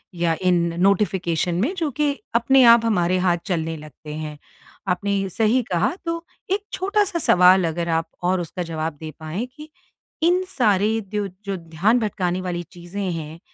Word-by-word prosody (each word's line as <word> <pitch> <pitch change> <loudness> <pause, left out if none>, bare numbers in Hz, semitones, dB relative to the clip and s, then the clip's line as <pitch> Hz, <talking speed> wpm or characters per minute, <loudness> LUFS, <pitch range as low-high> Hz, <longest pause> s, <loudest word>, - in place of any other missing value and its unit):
या 170 -1 +1
इन 180 -1 +4 0.3
नोटिफ़िकेशन 180 -4 +1
में 280 - 0
जो 325 -4 0
कि 295 -1 +3 0.2
अपने 260 +3 +5
आप 230 -1 +3
हमारे 185 -5 +2
हाथ 175 -1 +3
चलने 165 -3 -2
लगते 150 0 -10
हैं। 155 -1 -6 0.5
आपने 200 +2 0
सही 225 +6 +2
कहा 185 - +1
तो 335 0 -2 0.3
एक 400 +1 +1
छोटा-सा 400 -1 0
सवाल 180 - +5
अगर 170 +1 -2
आप 165 0 0 0.2
और 180 +1 +1
उसका 175 +2 -5
जवाब 160 -1 -3
दे 155 -1 -6
पाएँ 160 +9 -4
कि 305 +1 -11 0.5
इन 355 +2 +3
सारे 220 - +2 0.2
दो 205 -1 0 0.2
जो 195 -1 -2
ध्यान 175 +8 +1
भटकाने 185 -5 -1
वाली 175 -1 -3
चीज़े 175 +3 -7
हैं। 165 -4 -4
185 Hz, 165 wpm, -22 LUFS, 170-230 Hz, 0.5 s, अपने